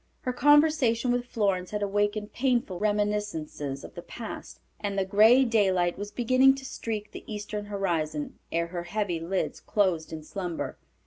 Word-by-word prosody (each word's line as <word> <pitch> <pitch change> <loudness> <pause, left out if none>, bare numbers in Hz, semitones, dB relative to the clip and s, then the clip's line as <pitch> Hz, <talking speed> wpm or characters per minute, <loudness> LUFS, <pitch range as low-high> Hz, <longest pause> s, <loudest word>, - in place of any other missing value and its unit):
Her 250 - -2
conversation 290 -4 +4
with 245 0 -1
Florence 195 -6 0
had 210 -1 -2
awakened 205 +1 -1
painful 240 -8 0
reminiscences 205 -9 -1
of - - -10
the 175 - -7
past, 225 +5 -8 0.2
and 200 -1 -3
the 195 - +1
gray 220 +7 +6
daylight 190 -6 +2
was 205 +1 -5
beginning 255 +4 +4
to 270 0 -9
streak 220 -5 -5
the - - -9
eastern 210 0 -4
horizon 165 -7 -2
ere 170 0 +1
her 175 0 -5
heavy 195 -3 -1
lids 180 +3 -2
closed 185 -6 0
in 160 -1 -6
slumber. 180 0 -5
205 Hz, 155 wpm, -27 LUFS, 180-230 Hz, 0.2 s, gray